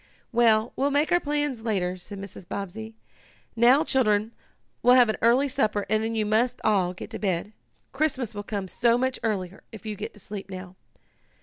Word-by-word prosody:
"Well, 230 Hz, -1 st, +3 dB
we'll 275 Hz, +2 st, +1 dB
make 290 Hz, +2 st, +1 dB
our 350 Hz, -, +5 dB
plans 290 Hz, -5 st, -2 dB
later," 190 Hz, -5 st, -1 dB
said 190 Hz, +3 st, -9 dB
Mrs. 195 Hz, -2 st, -10 dB
Bobbsey. 220 Hz, +4 st, -6 dB, 0.6 s
"Now, 245 Hz, +6 st, +5 dB
children, 220 Hz, -7 st, +1 dB, 0.5 s
we'll 245 Hz, +1 st, +6 dB
have 245 Hz, -3 st, +6 dB
an 220 Hz, -, 0 dB
early 245 Hz, +5 st, +4 dB
supper 215 Hz, -7 st, 0 dB
and 215 Hz, 0 st, +2 dB
then 225 Hz, +1 st, -2 dB
you 215 Hz, -1 st, +1 dB
must 220 Hz, +4 st, +1 dB
all 185 Hz, -4 st, +2 dB
get 200 Hz, -, -9 dB
to 220 Hz, -, -5 dB
bed. 195 Hz, +1 st, -2 dB, 0.4 s
Christmas 270 Hz, -5 st, -1 dB
will 205 Hz, -, -4 dB
come 200 Hz, -2 st, -4 dB
so 235 Hz, +5 st, +2 dB
much 260 Hz, +1 st, -1 dB
earlier 195 Hz, -4 st, -3 dB
if 220 Hz, -3 st, -11 dB
you 215 Hz, -1 st, -3 dB
go -, -, -4 dB
to 210 Hz, -, -18 dB
sleep 200 Hz, 0 st, -8 dB
now." 185 Hz, -1 st, -8 dB
220 Hz, 190 wpm, -26 LUFS, 200-250 Hz, 0.6 s, we'll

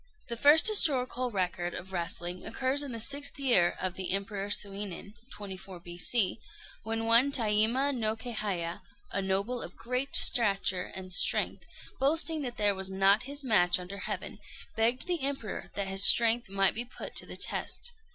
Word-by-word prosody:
The 235 Hz, -, -3 dB
first 295 Hz, -, +6 dB
historical 255 Hz, -, +2 dB
record 180 Hz, -4 st, -3 dB
of 190 Hz, +2 st, -9 dB
wrestling 175 Hz, 0 st, -4 dB
occurs 260 Hz, +4 st, -2 dB
in 285 Hz, -2 st, -6 dB
the 230 Hz, -, -6 dB
sixth 280 Hz, +5 st, +1 dB
year 235 Hz, -11 st, +2 dB
of 185 Hz, -1 st, -3 dB
the 185 Hz, -1 st, -2 dB
Emperor 200 Hz, 0 st, -3 dB
Suinin 200 Hz, -1 st, -3 dB, 0.2 s
(24 190 Hz, -2 st, -9 dB
B.C.), 180 Hz, +5 st, +1 dB, 0.4 s
when 225 Hz, 0 st, -3 dB
one 235 Hz, +5 st, +6 dB
Taima 235 Hz, +4 st, +3 dB
no 220 Hz, -2 st, -1 dB
Kéhaya, 205 Hz, -8 st, -4 dB, 0.3 s
a 195 Hz, -, -2 dB
noble 195 Hz, +6 st, -2 dB
of -, -, -8 dB
great 255 Hz, +3 st, -3 dB
stature 195 Hz, -6 st, +1 dB
and 185 Hz, -1 st, -9 dB
strength, -, -, 0 dB, 0.3 s
boasting 315 Hz, +3 st, +2 dB
that 245 Hz, -3 st, -5 dB
there 205 Hz, -1 st, +2 dB
was 190 Hz, 0 st, -2 dB
not 195 Hz, +3 st, +2 dB
his 285 Hz, 0 st, -2 dB
match 180 Hz, -8 st, +3 dB
under 185 Hz, +2 st, -8 dB
heaven, -, -, -6 dB, 0.4 s
begged 230 Hz, +3 st, +1 dB
the 350 Hz, -4 st, -2 dB
Emperor 270 Hz, -6 st, -4 dB
that 200 Hz, -1 st, -2 dB
his 195 Hz, +1 st, +2 dB
strength 235 Hz, 0 st, +5 dB
might 195 Hz, 0 st, +2 dB
be 235 Hz, -, -4 dB
put 245 Hz, -, -10 dB
to -, -, -3 dB
the -, -, -8 dB
test. 485 Hz, -, -1 dB
215 Hz, 165 wpm, -29 LUFS, 190-250 Hz, 0.4 s, first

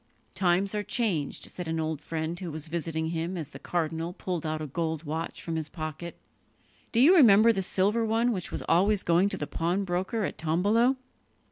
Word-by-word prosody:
"Times 190 Hz, +2 st, +1 dB
are 210 Hz, -, 0 dB
changed," 200 Hz, -, -1 dB
said 180 Hz, -2 st, -6 dB
an 160 Hz, 0 st, -1 dB
old 155 Hz, -2 st, -2 dB
friend 160 Hz, +2 st, -4 dB
who 180 Hz, -, -5 dB
was 155 Hz, +1 st, -6 dB
visiting 160 Hz, -1 st, -2 dB
him, 170 Hz, +2 st, -3 dB
as 155 Hz, -4 st, -5 dB
the -, -, -11 dB
cardinal 165 Hz, 0 st, -2 dB
pulled 175 Hz, -4 st, -4 dB
out 155 Hz, 0 st, -2 dB
a 155 Hz, -, -4 dB
gold 160 Hz, +2 st, -3 dB
watch 160 Hz, +2 st, -4 dB
from 165 Hz, -, -3 dB
his 155 Hz, -2 st, -3 dB
pocket. 155 Hz, +1 st, -6 dB, 0.7 s
"Do 230 Hz, -, +1 dB
you 310 Hz, +9 st, +7 dB
remember 230 Hz, -, +7 dB
the 195 Hz, -, -1 dB
silver 200 Hz, +5 st, +1 dB
one 225 Hz, +2 st, +2 dB
which 185 Hz, -6 st, -4 dB
was -, -, -4 dB
always 200 Hz, +3 st, +3 dB
going 175 Hz, +4 st, +3 dB
to -, -, -4 dB
the 145 Hz, -, -3 dB
pawnbroker 185 Hz, +6 st, -1 dB
at -, -, -4 dB
Tombolo?" 205 Hz, +11 st, +2 dB
175 Hz, 195 wpm, -28 LUFS, 160-200 Hz, 0.7 s, you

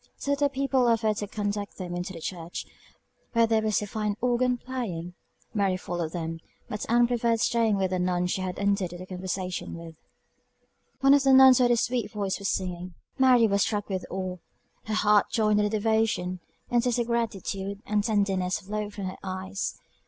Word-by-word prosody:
Some 280 Hz, -, -3 dB
of 280 Hz, -, -2 dB
the 285 Hz, -1 st, +3 dB
people 270 Hz, -2 st, +1 dB
offered 220 Hz, -2 st, +2 dB
to 205 Hz, -, -3 dB
conduct 205 Hz, -1 st, -3 dB
them 180 Hz, -2 st, -5 dB
into 175 Hz, +2 st, -4 dB
the 170 Hz, -, -8 dB
church, 170 Hz, 0 st, -5 dB, 0.7 s
where 230 Hz, -1 st, +5 dB
there 225 Hz, -1 st, +2 dB
was 215 Hz, -1 st, +1 dB
a -, -, -3 dB
fine 210 Hz, 0 st, -2 dB
organ 250 Hz, 0 st, +1 dB
playing; 210 Hz, -10 st, -5 dB, 0.4 s
Mary 195 Hz, -4 st, +1 dB
followed 175 Hz, -3 st, -4 dB
them, 165 Hz, -1 st, -4 dB, 0.3 s
but 210 Hz, -, -5 dB
Ann 240 Hz, +1 st, +5 dB
preferred 235 Hz, -1 st, +1 dB
staying 225 Hz, -2 st, +2 dB
with 190 Hz, -1 st, 0 dB
a 185 Hz, -, 0 dB
nun 180 Hz, 0 st, +1 dB
she 180 Hz, +1 st, -1 dB
had 185 Hz, -1 st, -3 dB
entered 200 Hz, -3 st, 0 dB
into 180 Hz, +1 st, -8 dB
conversation 185 Hz, -1 st, -4 dB
with. 165 Hz, -1 st, -9 dB, 1.1 s
One 275 Hz, +1 st, +6 dB
of 285 Hz, -, +5 dB
the 270 Hz, 0 st, +4 dB
nuns, 260 Hz, -1 st, +8 dB
who 250 Hz, -, +5 dB
had 245 Hz, -, +3 dB
a 240 Hz, -, +4 dB
sweet 240 Hz, -2 st, -1 dB
voice, 200 Hz, -2 st, -2 dB
was 200 Hz, -, -1 dB
singing; 180 Hz, -1 st, -3 dB, 0.2 s
Mary 255 Hz, -3 st, +6 dB
was 200 Hz, -2 st, +2 dB
struck 205 Hz, 0 st, -1 dB
with 190 Hz, -2 st, -3 dB
awe; 185 Hz, -1 st, -4 dB, 0.5 s
her 220 Hz, -, -2 dB
heart 210 Hz, -1 st, +4 dB
joined 215 Hz, -2 st, +2 dB
in 210 Hz, -, +3 dB
the -, -, +1 dB
devotion; 215 Hz, -4 st, 0 dB, 0.3 s
and 240 Hz, -1 st, +4 dB
tears 245 Hz, 0 st, 0 dB
of 240 Hz, -, +1 dB
gratitude 200 Hz, -3 st, -3 dB
and 210 Hz, 0 st, +1 dB
tenderness 195 Hz, -4 st, +1 dB
flowed 210 Hz, +1 st, -5 dB
from 200 Hz, -, -4 dB
her 185 Hz, -, -5 dB
eyes. 190 Hz, +1 st, -4 dB
205 Hz, 195 wpm, -27 LUFS, 185-230 Hz, 1.1 s, nuns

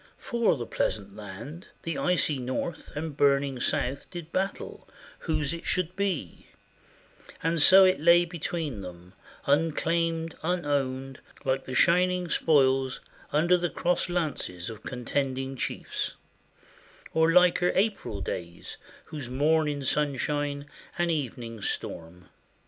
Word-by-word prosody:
For 235 Hz, -, +1 dB
the 120 Hz, -, -4 dB
pleasant 100 Hz, -3 st, -2 dB
land 110 Hz, -, -9 dB, 0.2 s
The 165 Hz, -, -3 dB
icy 170 Hz, -6 st, +2 dB
North 130 Hz, +6 st, -4 dB
and 150 Hz, -1 st, -4 dB
burning 140 Hz, -2 st, +2 dB
South 130 Hz, +3 st, -1 dB
did 170 Hz, -2 st, -8 dB
battle 195 Hz, +1 st, -3 dB, 0.3 s
Whose 155 Hz, -2 st, 0 dB
it 170 Hz, -, -6 dB
should 180 Hz, -1 st, 0 dB
be; 185 Hz, -, -3 dB, 1.0 s
and 165 Hz, 0 st, +2 dB
so 190 Hz, +4 st, +9 dB
it 185 Hz, 0 st, +3 dB
lay 170 Hz, +2 st, +6 dB
between 165 Hz, -, -4 dB
them 90 Hz, 0 st, -10 dB, 0.3 s
Unclaimed, 165 Hz, +2 st, +1 dB
unowned, 140 Hz, -6 st, -1 dB, 0.3 s
like 135 Hz, 0 st, 0 dB
the 130 Hz, -, -5 dB
shining 180 Hz, +3 st, +3 dB
spoils 135 Hz, -5 st, +3 dB, 0.3 s
Under 175 Hz, +3 st, +3 dB
crossed 175 Hz, +2 st, 0 dB
lances 140 Hz, -, -2 dB
of 110 Hz, -, -10 dB
contending 135 Hz, +1 st, -2 dB
chiefs; -, -, -3 dB, 1.0 s
Or 160 Hz, 0 st, +4 dB
liker 180 Hz, 0 st, +5 dB
April 195 Hz, -, 0 dB
days 85 Hz, -2 st, -6 dB, 0.3 s
whose 145 Hz, -6 st, -7 dB
morn 155 Hz, +4 st, +2 dB
in 145 Hz, -1 st, -2 dB
sunshine 145 Hz, +1 st, 0 dB, 0.3 s
And 175 Hz, -1 st, +1 dB
evening 120 Hz, -7 st, -4 dB
storm. 90 Hz, -1 st, -4 dB
150 Hz, 120 wpm, -28 LUFS, 130-170 Hz, 1.0 s, so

